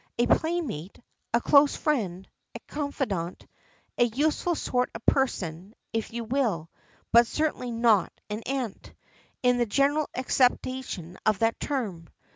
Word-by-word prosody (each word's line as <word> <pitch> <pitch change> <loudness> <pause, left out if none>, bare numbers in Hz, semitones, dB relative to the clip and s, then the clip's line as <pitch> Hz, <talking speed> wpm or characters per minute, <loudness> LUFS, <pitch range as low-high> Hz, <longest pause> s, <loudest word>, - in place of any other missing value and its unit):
A 240 - +3
playmate, 275 - -1 0.3
a 235 - +3
close 280 +3 +5
friend, 195 - -1 0.3
a - - -5
confidante, 265 - -3 0.5
a - - +7
useful 300 +8 0
sort 250 -4 0
of 225 - -8
person, 190 -7 0 0.2
if 225 -1 -2
you 235 0 -4
will, 220 - -1 0.4
but 235 0 +7
certainly 305 -4 -1
not 230 -3 +3 0.2
an 210 +1 -4
aunt, 260 -6 -4 0.5
in 250 0 +4
the 240 - +2
general 280 +7 +2
acceptation 250 -8 0
of 215 -2 +3
that 225 +2 +1
term. 205 - -3
240 Hz, 130 wpm, -27 LUFS, 205-275 Hz, 0.5 s, a